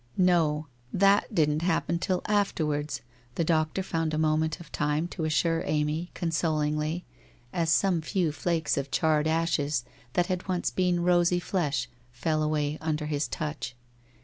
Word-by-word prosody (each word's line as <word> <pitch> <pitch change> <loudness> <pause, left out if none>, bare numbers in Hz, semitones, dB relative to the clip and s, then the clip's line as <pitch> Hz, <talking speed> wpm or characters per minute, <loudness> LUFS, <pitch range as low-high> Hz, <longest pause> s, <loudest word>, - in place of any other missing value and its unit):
'No. 165 -4 +3 0.3
That 200 +1 +3
didn't 150 -1 +2
happen 170 0 +1
till 180 0 -1
afterwards/ 155 -8 0 0.3
the - - +1
doctor 160 +3 +1
found 165 -3 -1
a - - -1
moment 155 0 +1
of 170 -3 -12
time 150 +3 0
to 165 -3 -3
assure 165 +2 +1
Amy, 155 +3 -1
consolingly, 155 0 0 0.5
as 165 -2 0
some 175 0 +3
few 165 0 0
flakes 165 0 0
of 140 0 -2
charred 155 +1 +2
ashes 155 -5 +1 0.3
that 175 - +2
had 185 0 -3
once 180 -2 0
been 180 -2 +1
rosy 175 0 +3
flesh 150 -9 -1 0.2
fell 155 +6 -1
away 150 -1 0
under 155 -1 -1
his 150 -2 -1
touch. 145 -3 -4
160 Hz, 150 wpm, -28 LUFS, 150-175 Hz, 0.5 s, No